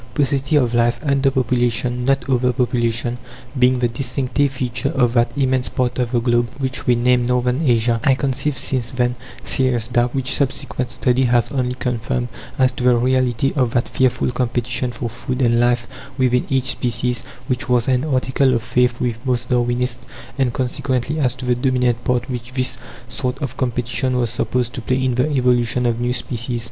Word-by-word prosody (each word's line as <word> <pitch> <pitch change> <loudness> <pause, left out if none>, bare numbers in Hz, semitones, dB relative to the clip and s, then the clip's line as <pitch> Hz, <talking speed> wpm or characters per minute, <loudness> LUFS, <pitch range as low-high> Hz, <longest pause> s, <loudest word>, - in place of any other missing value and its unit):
Paucity 140 +1 +1
of 125 -5 +2
life, 120 0 +2
under 140 -2 +2
population 125 -1 0
not 135 +1 +1
over 125 -1 +2
population 120 -1 -1 0.4
being 125 0 +4
the 125 -1 +1
distinctive 130 +3 -1
feature 130 +1 -2
of 125 -5 +1
that 120 -1 +2
immense 130 -2 +1
part 125 0 -1
of 120 -2 -1
the 120 - +2
globe 120 0 +1
which 130 -2 -3
we 125 - +5
name 120 0 +2
Northern 125 +2 +1
Asia, 120 -4 +2
I 135 - +4
conceived 135 +1 -1
since 125 -3 -1
then 125 -1 0 0.3
serious 125 -3 +1
doubts 120 +1 +1
which 135 0 0
subsequent 130 -2 -1
study 125 +1 +1
has 120 -2 +2
only 125 -2 -1
confirmed 115 - -2 0.3
as 130 -1 +3
to 125 - -6
the 125 -1 +5
reality 130 +2 +1
of 125 -5 +1
that 120 - +1
fearful 130 -1 +1
competition 125 0 -1
for 120 - -4
food 125 +2 -4
and 120 -2 +3
life 120 -1 +2 0.3
within 125 -2 +1
each 135 0 +2
species, 120 0 -1 0.2
which 130 +2 -3
was 120 -2 +2
an 130 0 +2
article 130 -2 +1
of 115 - -1
faith 125 0 +1
with 115 -2 -2
most 125 -2 -1
Darwinists, 125 0 0 0.3
and, 130 -3 +1
consequently, 130 +3 -2
as 130 -3 +1
to 130 0 -7
the 125 - +2
dominant 125 -1 0
part 125 -1 0
which 125 -1 -6
this 130 -1 +1 0.3
sort 125 0 -3
of 135 -2 -4
competition 125 +1 -1
was 120 -2 0
supposed 125 +2 -1
to 130 - -5
play 130 +3 0
in 130 - +1
the 125 +5 +1
evolution 125 -3 +2
of 120 0 0
new 120 0 0
species. 120 0 -1
125 Hz, 185 wpm, -20 LUFS, 120-130 Hz, 0.4 s, we